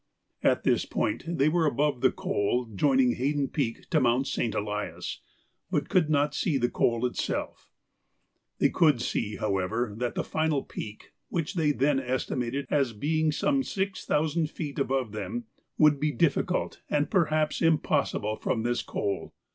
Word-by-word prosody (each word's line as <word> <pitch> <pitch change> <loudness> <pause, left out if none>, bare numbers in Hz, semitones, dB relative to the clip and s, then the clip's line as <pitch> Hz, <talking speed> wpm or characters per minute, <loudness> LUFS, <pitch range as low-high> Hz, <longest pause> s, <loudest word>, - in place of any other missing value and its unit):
At - - +2
this - - +2
point 110 +6 -1
they 165 -4 +2
were 160 0 +2
above 140 -1 0
the 130 - +5
col 120 +5 0
joining 130 +3 +3
Haydon 140 +1 0
Peak 115 -6 -2
to 160 - +4
Mount 125 +2 +3
St. 125 -4 -1
Elias, 105 0 -3 0.5
but - - -1
could 165 -4 +3
not 145 -1 +2
see 150 -1 +1
the 120 -2 0
col 115 +1 +1
itself. 125 - -3 0.9
They - - +3
could 150 -7 +3
see, 105 -3 -2
however, 105 +2 -1
that 125 -1 -2
the - - 0
final 155 -3 0
peak, 105 0 -8 0.2
which 165 +1 -2
they 160 -5 +2
then 140 0 +2
estimated 130 +1 -2
as 135 -5 +2
being 155 +7 +1
some 275 - +1
six 195 -6 -3
thousand 155 +1 +1
feet 150 -3 -5
above 130 -4 0
them, 110 +3 -4 0.3
would 150 -2 +5
be 150 +1 +1
difficult 160 0 0
and 150 0 +1
perhaps 155 -5 +1
impossible 145 -9 +1
from 115 - -1
this 120 0 0
col. 100 -1 -3
140 Hz, 155 wpm, -28 LUFS, 120-155 Hz, 0.9 s, the